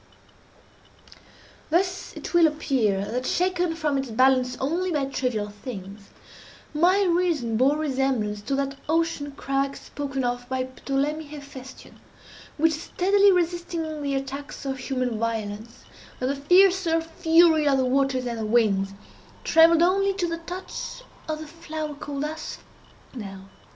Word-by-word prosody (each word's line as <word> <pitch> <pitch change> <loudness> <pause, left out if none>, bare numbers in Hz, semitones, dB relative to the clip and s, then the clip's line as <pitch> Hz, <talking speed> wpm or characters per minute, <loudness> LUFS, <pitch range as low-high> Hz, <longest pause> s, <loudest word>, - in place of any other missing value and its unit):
Thus 365 +3 0
it - - -7
will 340 -2 +6
appear 245 -10 0
that, 250 +4 -3
shaken 360 -2 +1
from 300 -4 0
its 270 -2 -4
balance 255 +1 +3
only 345 +7 -1
by 290 -4 +1
trivial 250 -6 -2
things, 205 -2 -9 0.6
my 360 +6 +4
reason 340 - +1
bore 265 +6 +3
resemblance 260 -8 -1
to 270 +7 -2
that 275 0 -2
ocean 325 -3 0
crag 275 0 -1
spoken 275 -2 -4
of 245 0 -2
by 260 -1 0
Ptolemy 275 +4 -2
Hephestion, 280 -3 -11 0.6
which 320 +1 +3
steadily 395 +5 +3
resisting 340 -3 -1
the 280 -1 -1
attacks 275 +2 -5
of 265 -1 -3
human 255 -3 -2
violence, 225 +1 -4 0.4
and 255 +1 0
the - - -2
fiercer 355 +3 +4
fury 325 -1 +4
of 275 -1 +4
the 260 - +2
waters 260 0 +1
and 235 -2 -3
the 220 - -2
winds, 200 -4 +2 0.5
trembled 330 0 +6
only 390 +2 +2
to 360 -3 0
the 335 0 -3
touch 360 +8 -7 0.3
of 310 - -1
the 315 - -8
flower 315 -1 -6
called 285 0 -4
Asphodel. 210 -9 -9
280 Hz, 135 wpm, -25 LUFS, 255-330 Hz, 0.6 s, will